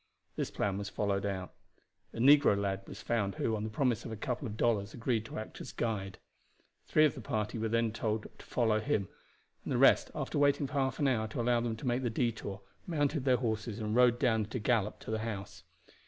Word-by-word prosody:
This - - -2
plan 100 -1 -1
was 100 -1 -4
followed 100 -1 -1
out. 95 -2 -4 0.6
A - - -11
negro 140 -3 +6
lad 100 -1 -1
was 105 - -9
found 105 -5 0
who, 110 - 0
on 105 - -3
the 110 - -3
promise 120 0 0
of 115 - -6
a - - -3
couple 125 +4 -3
of 105 -1 -6
dollars, 110 -3 +1
agreed 115 -2 -1
to - - -7
act 110 - -7
as - - -7
guide. 100 -4 -3 0.7
Three 155 - +5
of 150 - +2
the 130 - -8
party 105 +1 -2
were 110 0 -1
then 115 0 +1
told 110 -1 -2
off - - -13
to - - -12
follow 110 -3 +2
him, 110 -6 -1 0.5
and - - -5
the - - +1
rest, - - +5
after - - -2
waiting 145 0 +3
for 135 - -7
half 135 -2 0
an 145 - +2
hour 110 -4 +1
to 110 - -6
allow 120 0 +3
them 115 -1 -1
to 115 - -9
make 125 +1 +1
the 125 - 0
detour, 110 -4 -2 0.3
mounted 145 -4 0
their 130 -2 +4
horses 110 -2 -2
and 110 -1 -2
rode 125 -1 +5
down 115 -4 +2
at 110 - -9
a - - 0
gallop 105 -1 +1
to - - -6
the 110 - 0
house. 100 -5 -6
115 Hz, 235 wpm, -32 LUFS, 105-125 Hz, 0.7 s, negro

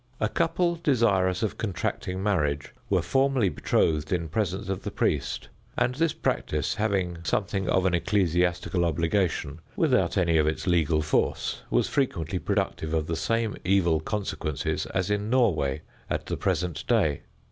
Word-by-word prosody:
A 105 - +2
couple 170 +5 +1
desirous 110 - +2
of 110 - -2
contracting 95 -2 -3
marriage 75 -8 0 0.2
were - - +2
formally 135 -6 +2
betrothed 80 -3 +1
in 85 -3 -1
presence 100 +3 -2
of 95 -1 -2
the - - -4
priest, - - -1 0.3
and 125 +1 +2
this 165 +4 +1
practice, 75 - -1
having 95 -5 -1
something 95 +4 -1
of 95 0 +2
an 90 - +2
ecclesiastical 90 -1 +1
obligation 85 -2 0 0.2
without - - +2
any 85 -3 +3
of 75 - +2
its 80 - -1
legal 80 -4 +2
force, 75 - 0
was - - +2
frequently 90 - -1
productive 80 -2 -1
of 80 -1 0
the 80 - -2
same 115 +4 0
evil 85 -4 +3
consequences 80 -5 -2
as 95 +1 -1
in 105 +1 -1
Norway 80 - +2 0.3
at - - -2
the - - -2
present 90 -1 -1
day. 95 - +2
90 Hz, 150 wpm, -27 LUFS, 80-105 Hz, 0.3 s, any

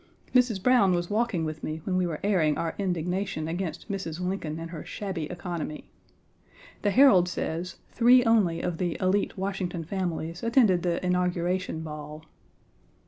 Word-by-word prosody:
Mrs. 245 -7 +3
Browne 220 -8 +5
was 175 +1 -2
walking 210 -6 0
with 155 0 -5
me 155 +1 -3
when 185 - -1
we 185 -1 +2
were 160 -3 -4
airing 175 -7 +2
our 165 -1 -2
indignation 180 -2 -2
against 165 -1 -4
Mrs. 190 -6 -4
Lincoln 180 -4 -3
and 165 0 -7
her 160 -3 -6
shabby 190 -6 -4
economy. 170 -2 -6 0.9
The 205 - +2
Herald 195 -6 +6
says 170 +1 -3 0.2
three 245 +1 +6
only 210 -8 +3
of 175 -2 -3
the 175 -2 -1
élite 195 +2 +1
Washington 190 -3 -3
families 170 -1 -3
attended 230 -7 +3
the 175 +1 -1
Inauguration 180 -1 0
Ball. 150 0 -8
180 Hz, 150 wpm, -27 LUFS, 165-195 Hz, 0.9 s, Herald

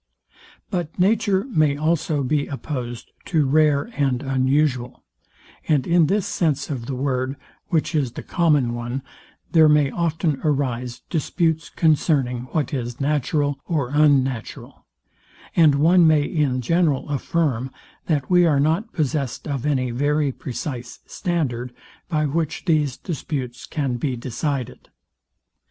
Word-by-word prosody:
But 175 -5 -3
nature 195 0 +2
may 155 - +1
also 155 -1 0
be 145 +2 0
opposed 125 -4 -5
to 155 -5 +1
rare 145 0 +3
and 135 -3 0
unusual; 130 -1 0 0.6
and 145 -5 +2
in 170 -2 +4
this 200 +3 +1
sense 150 -4 -1
of 120 -4 -4
the 135 - -3
word, 130 0 -1 0.3
which 165 0 0
is 135 -6 0
the - - -7
common 150 -8 +2
one, 120 +3 -4 0.5
there 160 -2 +6
may 150 -2 +4
often 160 -2 -1
arise 125 -5 -1
disputes 160 0 0
concerning 140 -6 +1
what 145 +1 -2
is 120 -3 -4
natural 145 0 0
or 145 -7 -1
unnatural; 135 -5 0 0.7
and 155 -4 +5
one 165 +4 +5
may 155 -2 +4
in 145 -4 0
general 160 0 +1
affirm, 140 -3 -1 0.4
that 145 -5 0
we 180 -1 +5
are 155 -5 +3
not 165 +10 +1
possessed 140 -4 -2
of 140 -1 -2
any 130 -4 0
very 145 +3 +1
precise 125 -3 -6
standard, 125 -8 -2 0.3
by 155 -1 +1
which 155 +4 -2
these 150 -6 +1
disputes 130 -6 -5
can 135 -5 -2
be 130 +1 -2
decided. 130 +2 -4
145 Hz, 130 wpm, -22 LUFS, 130-160 Hz, 0.7 s, there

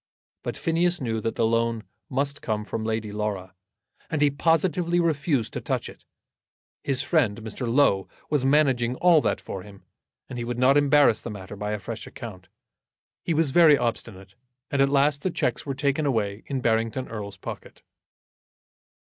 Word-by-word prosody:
But - - -5
Phineas 170 +2 +1
knew 115 -4 -2
that 115 - -2
the 115 - +2
loan 115 0 +1 0.3
must 140 +2 -1
come 105 -1 -2
from 110 - -4
Lady 110 -1 -2
Laura, 100 -3 -3 0.6
and 160 - -1
he 145 -1 +4
positively 170 +3 +1
refused 150 -7 0
to - - -4
touch - - -2
it. - - -13 0.8
His 135 -2 0
friend, 120 - +1
Mr. 115 +2 -4
Low, 100 -9 +3 0.2
was 145 -4 +1
managing 135 -4 +3
all 170 +1 +5
that - - 0
for 95 - -7
him, 100 0 -14 0.4
and 125 - -6
he - - -2
would 120 0 -4
not 130 +2 +4
embarrass 145 -5 +5
the - - -6
matter 100 -1 -8
by 105 +1 -3
a 105 - -3
fresh 110 +4 -7
account. 100 -7 -9 0.7
He 165 - -1
was 155 -3 +2
very 160 -2 +7
obstinate, 100 -5 -4 0.4
and 140 - +2
at 135 - +4
last 140 +1 +2
the 185 - 0
cheques 125 -6 -2
were 135 - -2
taken 140 +2 0
away 105 -5 -1
in 135 -2 -2
Barrington 115 +2 0
Erle's 100 -3 -7
pocket. - - -9
125 Hz, 175 wpm, -25 LUFS, 110-145 Hz, 0.8 s, very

